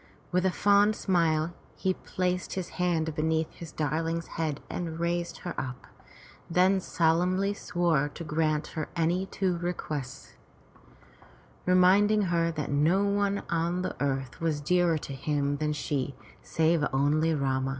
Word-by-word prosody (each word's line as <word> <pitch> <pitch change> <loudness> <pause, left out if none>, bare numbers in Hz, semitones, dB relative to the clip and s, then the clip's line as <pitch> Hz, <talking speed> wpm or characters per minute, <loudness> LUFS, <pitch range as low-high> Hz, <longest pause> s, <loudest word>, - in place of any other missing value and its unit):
With 180 +1 +2
a - - +1
fond 205 +2 +4
smile, 165 -4 +1 0.2
he 190 - 0
placed 180 0 -2
his 185 -2 -4
hand 165 -3 +1
beneath 160 +1 0
his 165 -2 -9
darling's 165 +2 -1
head 155 -3 -2
and 165 -2 -4
raised 170 0 -1
her - - -3
up, 125 -1 -7 0.6
then 185 +3 +4
solemnly 180 +3 +1
swore 170 -7 0
to 170 - -6
grant 155 -1 0
her 155 -2 -3
any 175 +3 +1
two 185 -3 -1
requests, 150 -6 -5 1.3
reminding 195 +4 +5
her 170 0 +2
that 150 -3 -4
no 160 +8 +3
one 200 0 +1
on 170 +2 0
the - - -3
earth 135 -1 -2
was 160 -3 0
dearer 175 +2 +2
to 145 - -7
him 145 +1 -1
than 150 +1 -1
she, 145 -2 -2 0.3
save 160 -1 +1
only 150 +4 +2
Rama. 135 -2 0
165 Hz, 140 wpm, -28 LUFS, 150-180 Hz, 1.3 s, reminding